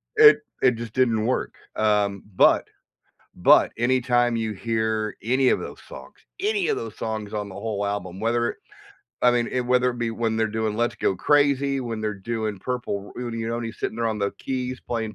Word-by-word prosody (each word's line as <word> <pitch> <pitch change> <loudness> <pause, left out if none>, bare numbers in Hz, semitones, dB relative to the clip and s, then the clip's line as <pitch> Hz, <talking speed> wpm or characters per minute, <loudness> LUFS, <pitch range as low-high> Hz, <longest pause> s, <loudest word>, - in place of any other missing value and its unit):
It 435 0 +8 0.2
it 125 -2 +6
just 115 -1 -7
didn't 115 -4 +2
work. 130 - -1 0.2
Um, 105 -2 +1
but - - +5 0.7
but - - +6
anytime 120 -1 +2
you 110 -1 -2
hear 110 0 -1
any 130 +3 +2
of - - +2
those - - -8
songs - - -11 0.3
any 415 0 +1
of 430 - +1
those - - -7
songs 110 -1 -4
on 105 -1 -3
the 95 - -10
whole 100 -1 -3
album, 95 -2 -4
whether 120 +1 +1
it - - -10 0.7
I 125 - +6
mean 120 -1 +1
it 125 - +1
whether 125 0 +3
it 120 - -7
be 115 -1 -1
when 115 0 -1
they're 110 0 +2
doing 110 0 -2
Let's 120 0 0
Go 100 - 0
Crazy, 140 +1 +2
when 115 -3 -4
they're 110 -1 -2
doing 110 0 -3
Purple 105 -4 -4
R 125 - -4
you 115 0 -3
know, 115 - -1
when 120 - -4
he's 115 - -7
sitting 110 - -3
there 115 0 0
on 110 -1 -2
the 100 0 0
keys 130 -1 -3
playing 110 -2 -4
115 Hz, 205 wpm, -24 LUFS, 110-125 Hz, 0.7 s, It